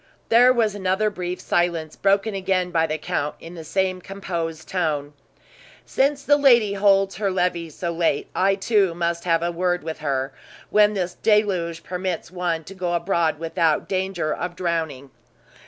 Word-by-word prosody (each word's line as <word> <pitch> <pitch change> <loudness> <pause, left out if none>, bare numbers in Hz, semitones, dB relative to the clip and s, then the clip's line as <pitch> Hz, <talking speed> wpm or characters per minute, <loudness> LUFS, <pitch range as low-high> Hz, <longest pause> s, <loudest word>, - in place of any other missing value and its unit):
There 245 +2 +6
was 230 -4 +2
an 195 -2 -5
other 210 +3 +2
brief 180 -2 -4
silence, 170 -3 -1
broken 200 +2 +1
again 185 -2 0
by 165 -2 +2
the 155 - -2
count, 150 -1 -3
in 165 - -10
the 165 -2 -8
same 185 +3 -1
composed 170 -5 -5
tone: 150 -5 -2 0.7
"Since 280 +1 +1
the 290 0 +4
lady 240 -8 +5
holds 195 -1 +3
her 200 -1 0
levee 180 -3 -1
so 170 +3 -4
late, 165 -4 0
I, 195 +1 +2
too, 195 -3 +1
must 170 0 -2
have 165 -1 +2
a 175 - 0
word 175 0 -1
with 160 0 -5
her, 135 -2 -2 0.4
when 210 0 +4
this 185 -2 -2
deluge 185 -6 +1
permits 180 -2 -4
one 175 -3 -2
to 190 - -10
go 180 -2 -2
abroad 170 -2 +1
without 165 -1 0
danger 185 -4 -1
of 180 0 -4
drowning." 160 -7 -3
180 Hz, 170 wpm, -23 LUFS, 165-195 Hz, 0.7 s, There